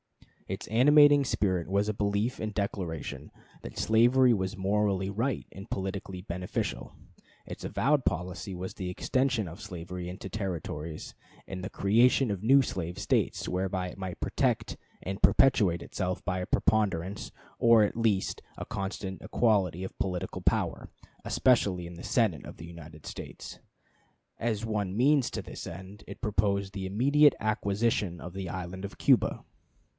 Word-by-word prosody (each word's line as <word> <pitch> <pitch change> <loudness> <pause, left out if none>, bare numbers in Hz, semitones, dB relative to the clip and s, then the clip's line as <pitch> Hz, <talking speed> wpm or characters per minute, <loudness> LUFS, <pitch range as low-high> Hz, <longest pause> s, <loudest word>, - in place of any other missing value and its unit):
Its - - -5
animating 145 +5 +6
spirit 95 -9 0
was 100 +2 +1
a 110 - 0
belief 100 +4 0
and 110 -1 -3
declaration 95 -6 -4 0.3
that - - -9
slavery 120 +3 +5
was 95 0 -2
morally 100 0 +1
right 115 +6 -1
and 100 +3 -10
politically 95 -1 -4
beneficial; 90 -1 -3 0.5
its - - -8
avowed 145 -1 +1
policy 90 +3 -2
was 90 +1 -5
the 90 -2 -5
extension 125 +3 0
of 85 +5 -9
slavery 90 -2 -6
into 95 +2 -7
the 95 - -8
Territories, 80 -5 -5 0.3
and 95 -1 -6
the - - -3
creation 115 +4 +3
of 100 -1 -4
new 135 +5 +6
slave 90 -6 -4
States, - - 0
whereby 95 0 -1
it - - -11
might 95 -2 -5
protect - - 0 0.3
and 95 +2 -4
perpetuate 95 -10 +4
itself 90 -1 -3
by 90 -1 -1
a 90 - -2
preponderance, 100 -3 0 0.3
or 115 -2 +6
at 105 - 0
least 110 -4 0 0.2
a - - -5
constant 95 -1 -4
equality, 100 -6 +1
of - - -9
political 90 -2 -3
power, - - 0 0.3
especially 100 -8 +2
in 85 - -8
the 85 - -10
Senate 110 - +1
of - - -10
the 80 - -9
United 80 -2 -11
States. - - -8 0.8
As 115 -1 -1
one 105 -3 -2
means 140 +1 +4
to - - -4
this - - -8
end, 95 +2 -9
it - - -9
proposed 100 -3 0
the 95 -1 -4
immediate 140 +8 +4
acquisition 105 -3 0
of 90 - -8
the 95 -2 -5
island 95 +1 -5
of 100 - -7
Cuba. - - +3
100 Hz, 155 wpm, -29 LUFS, 90-110 Hz, 0.8 s, animating